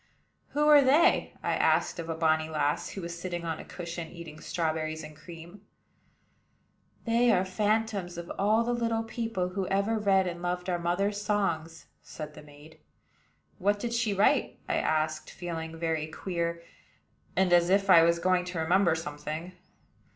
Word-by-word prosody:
"Who 295 +1 +2
are 295 -1 +8
they?" 280 +5 +3
I - - 0
asked - - +2
of 165 0 -5
a 165 - -1
bonny 160 -1 +1
lass, 150 -2 -1
who 195 - -7
was 170 0 -5
sitting 175 -2 -4
on 160 -1 -3
a - - -7
cushion, 170 -1 -6
eating 160 -2 -10
strawberries 160 -2 -2
and 155 0 -10
cream. 170 +4 -12 1.4
"They 235 +1 +3
are 180 - +3
the 185 - -9
phantoms 210 -3 0
of 170 0 -6
all 215 +3 +3
the 240 +1 -1
little 230 -1 0
people 225 -5 -3
who 185 0 -3
ever 200 +3 +1
read 195 -2 +3
and 175 -1 -4
loved 180 +1 -2
our 175 - 0
mother's 195 +4 0
songs," 170 -6 -1 0.2
said 150 -1 -8
the - - -11
maid. 150 +1 -16 0.8
"What 205 +2 +2
did 235 +2 -3
she 230 -2 +1
write?" 200 +1 +2
I - - 0
asked, 155 0 0
feeling 165 -2 -6
very 160 -2 -1
queer, 170 0 -3 0.7
and 190 -2 +3
as 175 0 +5
if 195 +1 +3
I 175 -4 +8
was 170 +1 +4
going 185 +1 +2
to 180 -2 -4
remember 170 +1 +3
something. 155 +2 -5
175 Hz, 170 wpm, -29 LUFS, 160-200 Hz, 1.4 s, are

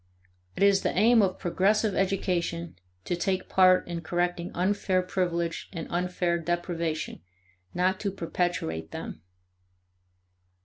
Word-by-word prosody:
It - - 0
is 200 -1 +5
the - - -1
aim 225 +3 +6
of 185 -2 +1
progressive 205 +4 +1
education 180 -3 -1 0.3
to 175 - -1
take 185 +1 -1
part 185 -1 +5
in 170 -1 -4
correcting 175 +1 -1
unfair 185 0 +1
privilege 170 -2 -2
and 165 -4 -5
unfair 175 -1 0
deprivation, 170 -1 -2 0.5
not 185 +1 +1
to 205 - -1
perpetuate 165 - -2
them. 80 - -7
180 Hz, 120 wpm, -27 LUFS, 170-190 Hz, 0.5 s, aim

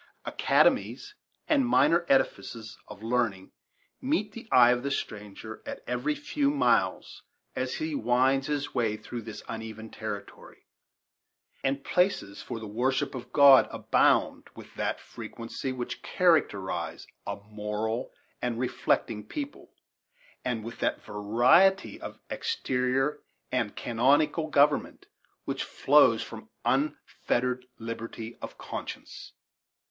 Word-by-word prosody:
Academies 410 0 +2 0.3
and 290 -4 +4
minor 170 - +3
edifices 115 -4 0
of 105 - -11
learning 115 -5 -1 0.5
meet 255 -7 0
the 230 +1 -10
eye 120 -1 +7
of 125 0 +1
the 140 - -2
stranger 105 -3 -5
at - - -7
every 125 +5 -1
few 290 -1 0
miles 285 -1 +1 0.3
as - - -2
he 315 -1 -3
winds 135 - +2
his 145 -1 -2
way 115 -4 0
through 120 +2 -7
this 110 -1 -8
uneven 110 -1 -7
territory, 105 -3 -8 1.0
and 135 +1 0
places 180 - 0
for 115 - -6
the 110 - -7
worship 130 +6 0
of 125 -2 -8
God 140 -2 +8
abound - - +2
with - - -12
that - - -2
frequency 115 +3 -6
which 125 -2 -5
characterize 95 - +1 0.2
a - - -2
moral 105 +3 -4 0.3
and 120 -2 -1
reflecting 120 -3 0
people, 285 -1 -7 0.7
and 115 -3 -2
with 115 +1 -8
that - - -1
variety 120 - +3
of - - -7
exterior 135 - 0 0.3
and 115 -5 -1
canonical 145 +7 +2
government 145 -1 +2 0.4
which - - -2
flows - - +4
from - - -10 0.2
unfettered 125 -3 0
liberty 115 0 -6
of - - -7
conscience. - - -7
125 Hz, 120 wpm, -28 LUFS, 110-150 Hz, 1.0 s, God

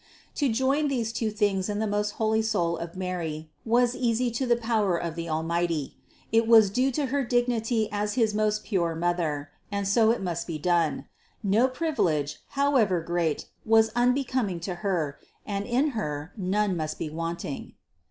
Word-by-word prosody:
To 285 -3 +1
join 270 +6 +2
these 235 -5 -1
two 225 -1 -1
things 205 -2 0
in 205 - -1
the 220 - 0
most 210 0 -1
holy 220 0 +1
soul 180 -7 0
of 170 +1 -7
Mary 165 -4 -4
was 240 +2 +2
easy 240 0 +1
to 250 +3 -2
the 240 - +4
power 220 -6 +1
of 170 -1 -3
the 170 0 -5
Almighty; 165 -1 -1 0.4
it 225 0 +3
was 220 -4 +7
due 255 +5 +2
to 290 +3 0
her 285 -1 +2
dignity 240 -2 +1
as 210 0 -1
his 225 -4 +2
most 215 0 +1
pure 170 -6 0
Mother, 160 -4 -1 0.2
and 200 -1 -1
so 220 +2 +4
it 230 - +2
must 175 -2 -3
be 165 -3 -3
done: 170 -1 +1 0.4
no 215 +5 +4
privilege, 205 - -1 0.2
however 255 -10 +3
great, 165 -2 -1 0.2
was 220 0 +4
unbecoming 245 -6 +1
to 180 +2 -3
Her; 165 -8 -1 0.3
and 200 -1 -3
in 255 +5 +2
Her 160 - -4
none 200 0 0
must 155 -2 -3
be 155 - -4
wanting. 165 -2 -5
205 Hz, 170 wpm, -27 LUFS, 170-235 Hz, 0.4 s, was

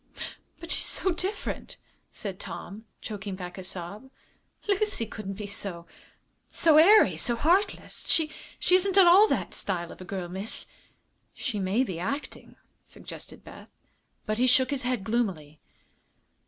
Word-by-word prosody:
"But 335 0 -7
she's - - 0
so 380 - +1
different," 370 +4 -3 0.3
said 195 -2 -6
Tom, 215 +3 -8 0.2
choking 205 -2 -5
back 180 0 -8
a - - -7
sob. 190 +7 -7 0.6
"Lucy 405 - +2
couldn't 205 -2 -6
be 210 +1 -6
so 200 -4 -1 0.6
so 315 -2 +5
airy, 410 +7 +7
so 240 - +2
heartless. 350 - 0
She 310 -2 +2 0.4
isn't 375 +1 +4
at 385 - +9
all 380 +5 +8
that - - -1
style 175 -3 -2
of - - -12
a - - -8
girl, 185 -1 -4
miss." 190 +5 -3 0.7
"She 240 -7 -3
may 195 +6 +1
be 185 -9 -4
acting," 280 +12 -5 0.3
suggested - - -10
Beth. - - -12 0.6
But 215 +1 -2
he 255 - +4
shook 260 +2 +4
his 280 -2 -1
head 250 -5 -1
gloomily. 190 -10 -2
220 Hz, 145 wpm, -27 LUFS, 190-320 Hz, 0.7 s, at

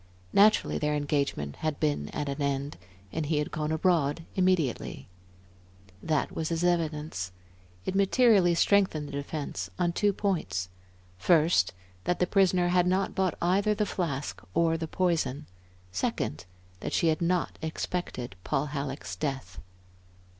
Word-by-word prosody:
Naturally 215 +2 +4
their 150 0 +1
engagement 140 - -1
had 155 -2 -2
been 150 -2 0
at 145 - -3
an 140 +1 -3
end, 140 0 -1 0.4
and 160 -2 -2
he 155 0 +1
had 150 - -1
gone 150 0 -2
abroad 160 -2 +1
immediately. 180 -9 0 0.9
That 155 -3 0
was 160 -1 -3
his 165 0 -1
evidence. 155 - 0 0.5
It - - -1
materially 195 -2 +4
strengthened 175 -5 +3
the - - -8
defence 140 - -4
on 175 -1 +1
two 205 +3 +2
points; 125 - -1 0.5
first, 155 - +4 0.3
that 180 - +1
the 180 - +2
prisoner 185 -2 +3
had 180 0 +3
not 190 +1 +1
bought 190 -2 0
either 200 +4 +3
the 210 0 +1
flask 150 -8 -3
or 165 0 +3
the 160 0 -3
poison; 155 -6 0 0.5
second, 90 -2 -2 0.3
that - - -4
she 165 - +3
had 155 +1 0
not 175 0 0
expected 160 - -4
Paul 135 - 0
Halleck's 135 -9 -4
death. 130 -5 -4
160 Hz, 140 wpm, -28 LUFS, 140-180 Hz, 0.9 s, Naturally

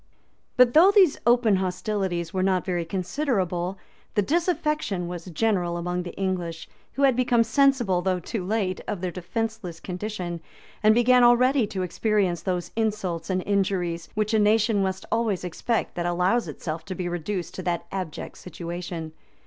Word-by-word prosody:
] - - -43
But 250 -1 +6
though 335 +5 +8
these 395 -7 +5
open 235 -4 +4
hostilities 185 -2 -2
were 185 - 0
not 185 -1 +1
very 175 -3 -1
considerable, 185 - -1 0.4
the 205 - +3
disaffection 300 - 0
was 175 -1 -6
general 180 -1 0
among 180 +1 -2
the 175 -1 -8
English, 180 -4 -3 0.3
who 280 - -1
had 265 -3 +5
become 245 -2 +3
sensible, 240 -7 +2
though 185 0 0
too 185 +3 -4
late, 190 -1 -1
of 205 -4 -3
their 185 -1 -2
defenceless 190 -1 -4
condition, 180 -3 -5 0.4
and 215 0 +5
began 250 +1 +5
already 245 0 +5
to 190 -2 -3
experience 190 -2 0
those 180 -2 -2
insults 205 -7 -2
and 185 -1 0
injuries, 185 -4 -1
which 215 +1 0
a 220 - +4
nation 215 0 +3
must 190 -1 -2
always 225 -5 0
expect 215 +6 -2
that 175 0 -2
allows 180 +7 +1
itself 160 0 -5
to 185 - -5
be 180 -1 -3
reduced 175 +2 -3
to - - -5
that 175 -1 -2
abject 185 -5 -5
situation. 170 -2 -6
190 Hz, 165 wpm, -25 LUFS, 175-225 Hz, 0.4 s, though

